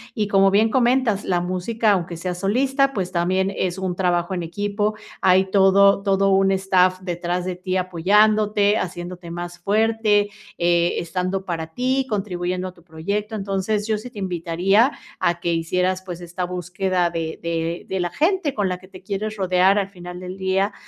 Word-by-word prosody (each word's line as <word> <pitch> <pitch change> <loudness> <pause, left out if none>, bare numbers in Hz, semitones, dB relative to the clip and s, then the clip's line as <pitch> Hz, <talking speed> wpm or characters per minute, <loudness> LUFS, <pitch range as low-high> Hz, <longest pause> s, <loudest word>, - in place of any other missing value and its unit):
y 210 -2 0
como 195 -1 +5
bien 215 +3 +4
comentas, 240 -3 +2
la 180 -2 +1
música, 185 +5 0
aunque 175 -3 -1
seas 180 +1 -4
solista, 270 +7 +1
pues, 185 -6 -3
también 185 +2 +1
es 185 0 -1
un 190 -2 -2
trabajo 175 -1 0
en 180 -2 -2
equipo, 205 +4 -2 0.3
hay 190 +1 +5
todo 195 0 +5
todo 195 -1 +2
un 195 0 +4
staff 185 -1 +2
detrás 175 0 -3
de 185 -1 -3
ti, 185 +1 -3
apoyándote, 205 +4 +3
haciéndote 175 -1 -5
más 175 0 -6
fuerte, 210 +1 +2 0.3
eh, 170 0 +2
estando 185 +2 -2
para 165 -3 -3
ti, 260 +4 0
contribuyendo 185 -3 -2
a - - -14
tu 170 - -21
proyecto, 200 +7 -4
entonces, 200 +1 -1
yo 220 - +1
sí 215 +4 -8
te 230 -4 -10
invitaría 185 - +2 0.3
a 175 0 +1
que 170 0 -1
hicieras, 180 +3 0
pues, 175 -2 -7
esta 175 +1 -5
búsqueda 180 0 -1
de 165 -1 -4
de 170 0 -3
de 190 - -2
la 175 -1 -1
gente 325 - 0
con 205 -5 0
la 180 - -2
que 185 - -16
te 185 -1 -13
quieres 210 +2 -3
rodear 190 0 +3
al 195 -1 -2
final 180 -2 -9
del 185 +1 -7
día 190 +2 0
190 Hz, 180 wpm, -22 LUFS, 175-205 Hz, 0.3 s, como